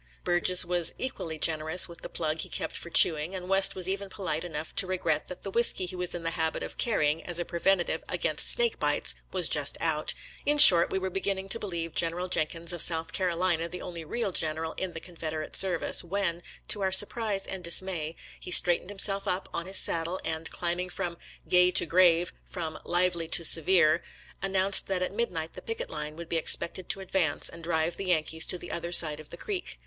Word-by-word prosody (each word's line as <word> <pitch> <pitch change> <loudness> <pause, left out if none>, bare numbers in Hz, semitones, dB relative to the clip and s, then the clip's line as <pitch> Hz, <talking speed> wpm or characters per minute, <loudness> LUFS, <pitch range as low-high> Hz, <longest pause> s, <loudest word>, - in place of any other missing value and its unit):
Surges 180 +1 +3
was 175 -1 +3
equally 165 -11 -5
generous 160 +2 +3
with 170 -1 -12
the - - -8
plug 160 -1 -3
he - - -2
kept - - -3
for 170 - -6
chew 165 - +7
ing, 155 +5 -6
and 180 -1 -7
West 195 0 +4
was 185 -1 +1
even 195 +1 -3
polite 180 -6 -4
enough 160 -2 -6
to 190 - +3
regret 170 -5 -2
that 180 - -6
the 195 - -6
whisky 235 -4 +1
he 180 - -4
was 180 -1 -4
in 170 - -6
the 165 - -2
habit 160 -1 -2
of - - -8
carrying 155 -9 0
as 175 -2 -3
a 175 - 0
preventive 175 +1 -1
against - - +1
snake 475 -1 +1
bites - - 0 0.2
was - - +1
just - - +1
out; - - -2 0.3
in 295 +1 +1
short, 175 - +9
we - - -2
were 190 0 -4
beginning 195 0 -3
to 230 +4 +1
believe 170 -6 -5
Gen 165 -1 +1
eral 180 +1 -6
Jenkins 165 +2 -1
of 175 - 0
South 165 -1 -1
Carolina 175 -2 -1
the 180 +1 -8
only 170 -2 -7
real 200 +5 -3
general 160 -1 -2
in 185 -2 -4
the 165 - -7
Confederate 160 -3 -7
service, 185 -2 +2
when, 175 -1 -2 0.3
to 205 - +1
our 190 -1 0
surprise 205 0 +2
and 190 -2 -6
dismay, 170 -2 +1 0.2
he - - -10
straightened 175 0 +4
himself 200 0 +1
up 185 +1 -2
on 170 - -4
his 190 0 +3
saddle, 170 +3 +1
and, 160 0 -3
climbing 175 +1 -3
from 175 -2 -5 0.2
" - - -26
gay 180 0 +4
to 180 - +3
grave, 175 0 +3
from 160 -4 -7
lively 175 -1 0
to 170 - +3
severe," 165 -1 +5 0.4
announced 195 0 +1
that 185 -1 -1
at 185 - -4
mid 235 +3 -1
night 160 -2 -6
the - - -10
picket 485 +2 -6
line 150 - -5
would 170 0 -9
be 165 - -1
expected 170 +2 +1
to 195 0 -3
ad 190 - -13
vance 165 -7 0
and 165 0 -12
drive 160 0 -1
the 195 - -5
Yankees 160 -2 0
to 180 - 0
the - - -10
other 170 0 -5
side 155 -3 +3
of 155 - -13
the 170 - -10
creek. 385 - -5
175 Hz, 220 wpm, -27 LUFS, 165-190 Hz, 0.4 s, short